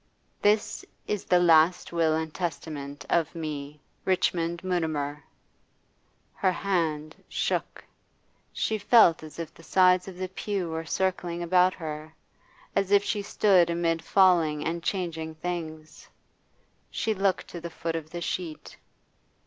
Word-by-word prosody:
'This 210 +1 +2 0.2
is 210 -2 -3
the 180 - +4
last 170 0 +4
will 165 -2 +2
and 160 -1 -3
testament 145 -4 -5
of 165 0 +1
me, 150 -2 -5 0.2
RICHMOND 170 -2 0
MUTIMER 155 -5 -2 0.5
' - - -42
Her 185 - +4
hand 160 -5 -2
shook. - - -2 0.7
She 220 -1 -1
felt 205 -6 +5
as 155 -1 -11
if 165 -1 -6
the - - -16
sides 180 +1 +4
of 185 -2 -8
the 185 0 -3
pew 190 -2 -3
were 160 0 -4
circling 175 -2 -1
about 180 +1 +4
her, 155 -1 -7 0.6
as 195 -1 +1
if 200 0 +5
she 205 0 -1
stood 190 -4 +3
amid 170 -1 0
falling 165 -5 +3
and 170 +1 -2
changing 165 -4 -3
things. 155 -2 -6 0.8
She 220 - -1
looked 195 -1 0
to 170 - -7
the 170 - -5
foot 165 0 -4
of 160 -1 -5
the 175 +1 -6
sheet. 165 -2 -5
170 Hz, 140 wpm, -27 LUFS, 160-185 Hz, 0.8 s, felt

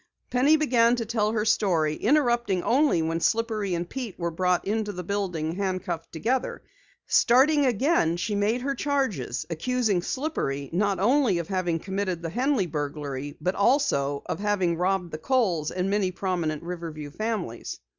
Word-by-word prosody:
Penny 280 +5 +4
began 245 -6 +3
to 235 -2 -3
tell 215 -1 0
her 215 -1 0
story, 175 -8 +2
interrupting 240 - +1
only 260 - +3
when 165 +1 -1
Slippery 215 -2 0
and 170 +1 -3
Pete 240 -3 -6
were 170 -1 -2
brought 180 +1 +1
into 210 0 -1
the 180 -2 -6
building 180 -5 -2
handcuffed 185 -4 -3
together. 245 +10 -2 0.4
Starting 275 +4 +4
again, 240 - +2
she 205 +5 -2
made 210 +4 +1
her 275 +2 -1
charges, 265 - -1
accusing 215 +2 0
Slippery 170 - -3
not 200 +2 +1
only 240 -1 +3
of 170 -2 -4
having 185 -3 0
committed 190 -1 -3
the 165 - -3
Henley 255 - +1
burglary, 145 -3 -4
but 180 +5 0
also 195 - +1
of - - -4
having 200 -4 +1
robbed 180 0 0
the 155 - -5
Kohls 180 - +1
and 185 +1 -2
many 200 -1 +1
prominent 175 -4 -2
Riverview 165 -4 -6
families. 205 - -4
195 Hz, 155 wpm, -26 LUFS, 170-235 Hz, 0.4 s, Penny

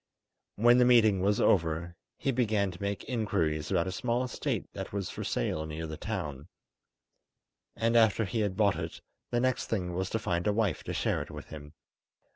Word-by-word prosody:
When 120 +3 +5
the 125 - +6
meeting 110 -6 +5
was 100 +2 +2
over, 85 -1 +2 0.2
he 135 - 0
began 110 -6 +1
to 90 - -12
make 100 -2 -2
inquiries 80 - -1
about 85 - +2
a 95 - -3
small 125 +2 0
estate 125 - -2
that - - -6
was 100 -2 -3
for - - -5
sale 80 +5 -1
near 80 +1 -5
the 80 -1 -5
town, 75 -1 -5 1.3
and 115 +1 +1
after 110 -1 +4
he 115 +4 -2
had 100 -3 -1
bought 105 -3 +3
it - - -6 0.3
the 120 - +1
next 130 0 0
thing 90 -5 -2
was 95 +1 -2
to - - 0
find 90 -4 -1
a 105 - +3
wife 105 -3 0
to - - -3
share - - 0
it - - -7
with - - -9
him. 75 -1 -10
100 Hz, 195 wpm, -30 LUFS, 85-115 Hz, 1.3 s, the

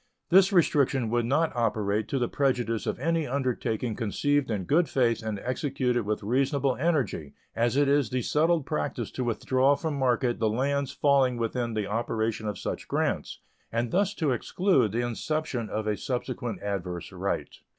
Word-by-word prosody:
This 190 +2 +6
restriction 140 - +2
would 120 -1 +1
not 155 +4 +1
operate 110 -2 0
to 140 - -1
the 120 -2 +1
prejudice 120 -5 0
of - - -1
any 165 +3 0
undertaking 125 -4 -1
conceived 140 +5 0
in 105 -4 -1
good 155 - +2
faith 120 -4 +2
and 110 -2 -3
executed 125 - -1
with 105 -1 -1
reasonable 135 +4 +1
energy, 135 - -1 0.2
as 120 +3 +1
it 145 0 +4
is 140 -4 +3
the 125 -1 -1
settled 160 +2 +2
practice 130 -7 -3
to 130 - -3
withdraw 130 +4 +2
from 160 +1 -3
market 125 -3 +1
the 110 -1 +2
lands 140 +4 0
falling 135 -4 +3
within 115 0 -2
the 105 -2 -1
operation 110 +1 -2
of 105 -2 -3
such - - -5
grants, - - -1 0.3
and 115 +1 -1
thus 200 +2 +1
to 155 -5 0
exclude 130 - +2
the 120 +3 0
inception 125 -1 -2
of 110 0 -3
a 105 -1 0
subsequent 125 -4 -4
adverse 90 -4 -4
right. - - -3
125 Hz, 170 wpm, -27 LUFS, 110-140 Hz, 0.3 s, This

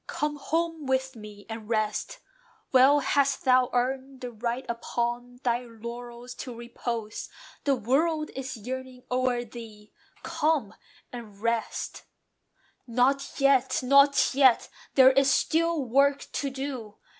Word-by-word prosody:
"Come 295 0 -2
home 325 0 -2
with 265 0 0
me, 210 -2 -11
and 225 -1 -8
rest: 215 - -1 0.5
well 270 +3 +6
hast 275 -1 +1
thou 255 -1 +4
earned 260 +2 -2
The 250 -1 -5
right 235 +3 -3
upon 240 +1 -3
thy 240 -1 +1
laurels 240 +1 -9
to 250 -3 -7
repose: 235 -2 -5 0.4
The 280 -2 +3
world 305 +7 0
is 265 -1 -5
yearning 255 +2 -7
o'er 250 -1 +1
thee: 220 -2 -12 0.3
Come 300 -9 0 0.4
and 220 -5 -9
rest!" 230 +1 -2 0.8
"Not 260 +4 +1
yet! 270 -2 +3
not 280 +2 +5
yet! 260 -3 +4 0.3
There 260 -1 +8
is 275 +1 +3
still 325 +1 +1
work 275 +3 +2
to 280 - -2
do. 260 -6 -6
255 Hz, 125 wpm, -27 LUFS, 235-275 Hz, 0.8 s, There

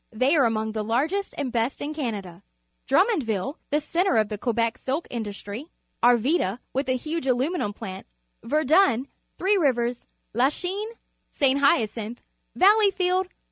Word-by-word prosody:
They 255 +7 +2
are 280 -5 +5
among 220 -1 0
the 215 -1 -3
largest 300 - -1
and 275 -4 -2
best 235 +3 -1
in 295 +2 -4
Canada. 205 - -5 0.5
Drummondi'ille, 275 - +1
the 295 - +2
centre 340 -3 +1
of 215 -1 +2
the 210 - -4
Quebec 230 -1 0
silk 275 +6 -2
industrj^, 220 +4 -6 0.3
Annda, 240 - +3 0.2
with 270 +1 -1
a 255 - +2
huge 310 +2 -4
aluminum 260 - 0
plant, 190 -2 -8 0.4
Verdun, 295 - +3 0.3
Three 400 +2 +2
Rivers, 245 -7 +1 0.3
Lachinc, 360 - -1 0.3
St.Hyn 280 0 +3
cinihe, 220 +2 -7 0.4
Valley 415 +2 +6
field. 370 -1 0
260 Hz, 140 wpm, -25 LUFS, 225-330 Hz, 0.5 s, Valley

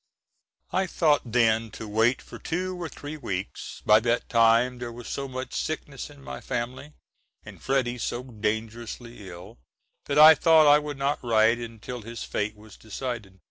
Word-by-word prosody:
I 190 0 +1
thought 150 -8 +1
then 115 -1 +3
to 110 - -7
wait 115 +4 +2
for - - -11
two 185 +2 -3
or 165 - -4
three 145 +2 -8
weeks; 95 -9 -6
by 105 0 +7
that 120 +2 -1
time 115 +1 +4
there 120 -1 -5
was 120 0 -10
so 140 0 -4
much 130 0 -6
sickness 150 -4 -4
in 145 -2 -15
my - - -7
family, 130 +4 -4 0.5
and - - -12
Freddy 125 -2 0
so 120 +2 -3
dangerously 115 -1 -5
ill, 85 -7 -11 0.5
that 140 - 0
I 155 +1 +11
thought 160 -1 +5
I 145 0 +7
would 150 -1 -6
not 140 +1 -1
write 115 0 +3
until 115 +1 -7
his 115 +2 -7
fate 105 +1 -2
was 105 -1 -15
decided. 110 -3 -6
120 Hz, 170 wpm, -26 LUFS, 110-140 Hz, 0.5 s, I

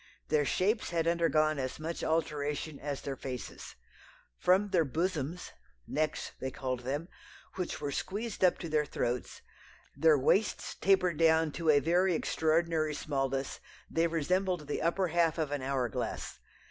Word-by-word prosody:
Their 150 -1 +3
shapes 205 - +1
had 165 -1 0
undergone 155 -3 +2
as 130 +1 -3
much 165 +2 -4
alteration 150 -2 -1
as 140 -1 -4
their 140 - -3
faces. 130 -2 -7 0.6
From 195 +3 +3
their 180 -4 +3
bosoms 165 +2 -2 0.3
(necks 155 - -1
they 130 - -1
called 130 -1 -3
them), 140 +6 -3 0.5
which 180 -3 -3
were 145 -1 -3
squeezed 205 +8 -3
up 180 - +5
to 170 - -6
their 155 -1 +2
throats, 120 -1 -3 0.5
their 160 -2 +5
waists 195 +10 +1
tapered 185 -4 +2
down 160 -1 +4
to 165 +2 -1
a 145 -2 +7
very 175 +4 +2
extraordinary 160 -1 +1
smallness; 135 -2 -2 0.3
they 165 +1 +2
resembled 175 +1 0
the 145 - -3
upper 175 +2 +1
half 170 -1 +2
of 155 -3 -1
an 145 -2 -2
hour 130 -2 0
glass. 110 - -4
160 Hz, 150 wpm, -31 LUFS, 145-170 Hz, 0.6 s, a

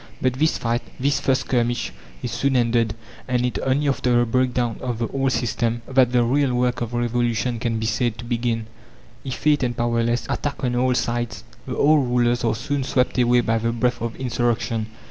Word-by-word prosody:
But 130 -1 +1
this 155 +5 +1
fight, 120 +1 -1 0.2
this 140 +2 +1
first 130 -1 +1
skirmish, 120 - -1 0.3
is - - -3
soon 140 -1 0
ended, 115 -3 +2 0.3
and 125 -1 +1
it 120 -5 -2
only 140 +3 +1
after 125 -3 +2
the 120 - +3
breakdown 125 -1 0
of 125 -3 -2
the 115 0 -1
old 135 -1 0
system 115 -1 -1
that 130 -2 +3
the 125 -1 +3
real 130 +1 +2
work 125 0 0
of 120 0 -3
revolution 120 0 0
can 115 -1 -1
be 110 - -2
said 115 +1 0
to 120 - -8
begin. 115 -1 -1 0.6
Effete 145 +3 +1
and 120 -2 -1
powerless, 120 0 0
attacked 145 -2 -3
on 125 -1 0
all 125 +1 +2
sides, 120 -1 -2 0.2
the - - -4
old 145 -2 +4
rulers 120 0 +2
are 115 - +1
soon 135 +5 -2
swept 130 -1 +1
away 120 0 +4
by 115 -1 +1
the 115 +1 0
breath 120 +1 0
of 115 -1 -3
insurrection. 115 -3 -1
120 Hz, 195 wpm, -22 LUFS, 115-130 Hz, 0.6 s, old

